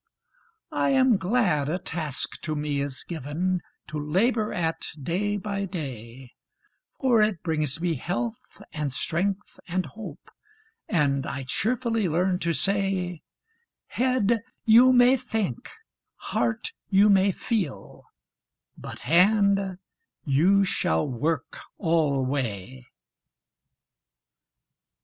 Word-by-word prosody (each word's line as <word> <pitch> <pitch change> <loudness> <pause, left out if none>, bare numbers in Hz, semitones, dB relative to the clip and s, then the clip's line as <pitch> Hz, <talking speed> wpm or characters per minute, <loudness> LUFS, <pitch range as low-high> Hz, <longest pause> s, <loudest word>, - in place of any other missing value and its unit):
I - - +1
am 260 -4 +4
glad 185 - +1
a 175 - 0
task 160 -6 -4
to 155 -1 -3
me 145 -1 -1
is 140 -2 -4
given 170 +4 -2 0.3
To 155 -1 -4
labor 210 +9 +1
at 165 -2 -2
day 195 +8 -1
by 200 0 -3
day; 130 - -7 0.7
For 245 -5 +4
it 210 -5 +1
brings 155 -3 -1
me 170 0 0
health, 230 - -5
and 150 -2 -2
strength, 190 +9 -2
and 185 0 -1
hope, 185 +11 -10 0.6
And 140 -7 +1
I 140 -1 -4
cheerfully 225 - 0
learn 180 +3 +1
to 170 - 0
say 190 -2 -1 0.7
'Head, 235 -3 +1 0.2
you 235 +3 +7
may 250 +1 +6
think; 220 - -3 0.5
heart, 115 -2 -2 0.2
you 200 +2 +5
may 195 -1 +5
feel; 190 - -4 0.7
But - - -9
hand, 195 +2 +3 0.5
you 175 +8 +4
shall 80 - 0
work 145 +3 -2 0.2
always!' 130 - -1
180 Hz, 105 wpm, -26 LUFS, 145-205 Hz, 0.7 s, you